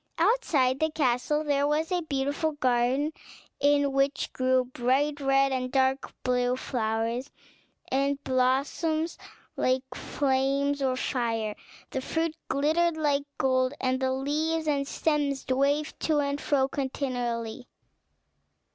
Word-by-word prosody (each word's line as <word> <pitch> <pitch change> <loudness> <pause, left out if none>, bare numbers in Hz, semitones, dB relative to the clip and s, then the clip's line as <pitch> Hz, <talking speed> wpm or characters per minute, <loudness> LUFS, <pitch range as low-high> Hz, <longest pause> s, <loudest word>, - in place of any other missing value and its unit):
Outside 325 - +2
the 315 - +2
castle 295 0 +1
there 285 -1 +1
was 310 +4 0
a 360 -1 +1
beautiful 290 +1 -1
garden, 260 +2 +1 0.5
in 285 -1 +3
which 275 +1 0
grew 255 0 +2
bright 260 +4 0
red 275 0 +3
and 255 -1 -2
dark 265 0 +1
blue 250 0 +1
flowers, 230 +1 -2 0.6
and 275 +1 +1
blossoms 280 +6 0 0.4
like 255 0 +1
flames 275 +1 0
of 260 -1 0
fire; 225 -5 -1 0.4
the 265 - -2
fruit 325 +3 -1
glittered 315 +4 +1
like 285 -2 +1
gold, 255 +1 +1
and 255 0 0
the 260 0 0
leaves 310 +4 -1
and 280 -2 +1
stems 290 -4 0
waved 280 +4 +1
to 310 -2 +1
and 280 0 0
fro 270 -2 +2
continually. 245 -4 -3
275 Hz, 120 wpm, -27 LUFS, 255-295 Hz, 0.6 s, in